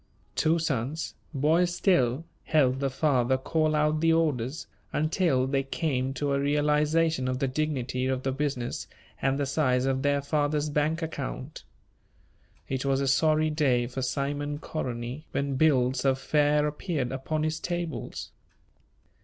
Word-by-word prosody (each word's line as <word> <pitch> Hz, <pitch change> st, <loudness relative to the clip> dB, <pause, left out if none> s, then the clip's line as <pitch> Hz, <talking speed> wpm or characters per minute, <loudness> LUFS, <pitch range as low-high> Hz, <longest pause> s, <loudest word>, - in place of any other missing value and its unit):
Two 160 Hz, +1 st, +3 dB
sons, 150 Hz, -1 st, -2 dB, 0.2 s
boys 165 Hz, +5 st, +2 dB
still, 140 Hz, -, +2 dB, 0.2 s
helped 135 Hz, -4 st, +3 dB
the 135 Hz, 0 st, 0 dB
father 130 Hz, -2 st, +2 dB
call 155 Hz, +3 st, 0 dB
out 150 Hz, 0 st, +2 dB
the 165 Hz, 0 st, +4 dB
orders, 150 Hz, -4 st, 0 dB, 0.3 s
until 155 Hz, -4 st, +1 dB
they 135 Hz, +1 st, +1 dB
came 135 Hz, -1 st, -1 dB
to 145 Hz, -1 st, -1 dB
a 140 Hz, -, +1 dB
realization 150 Hz, +1 st, +2 dB
of 130 Hz, 0 st, -1 dB
the 135 Hz, 0 st, 0 dB
dignity 130 Hz, -3 st, -1 dB
of 130 Hz, -1 st, -1 dB
the 135 Hz, -, 0 dB
business 135 Hz, -3 st, -3 dB, 0.3 s
and 135 Hz, 0 st, +1 dB
the 140 Hz, -, 0 dB
size 130 Hz, -2 st, +1 dB
of 135 Hz, 0 st, 0 dB
their 145 Hz, 0 st, +2 dB
father's 145 Hz, +1 st, 0 dB
bank 155 Hz, +3 st, 0 dB
account. 145 Hz, -2 st, -5 dB, 1.0 s
It 130 Hz, -1 st, -2 dB
was 135 Hz, -1 st, +1 dB
a 140 Hz, -, 0 dB
sorry 155 Hz, +3 st, +3 dB
day 135 Hz, -6 st, +2 dB
for 130 Hz, +2 st, -5 dB
Simon 145 Hz, +2 st, -2 dB
Koronyi 125 Hz, -1 st, -5 dB
when 140 Hz, 0 st, -1 dB
bills 130 Hz, -3 st, +3 dB
of 135 Hz, -1 st, +3 dB
fare 150 Hz, +1 st, +2 dB
appeared 150 Hz, -3 st, -2 dB
upon 150 Hz, +4 st, -2 dB
his 155 Hz, 0 st, -1 dB
tables. 175 Hz, -2 st, -4 dB
145 Hz, 145 wpm, -27 LUFS, 130-155 Hz, 1.0 s, the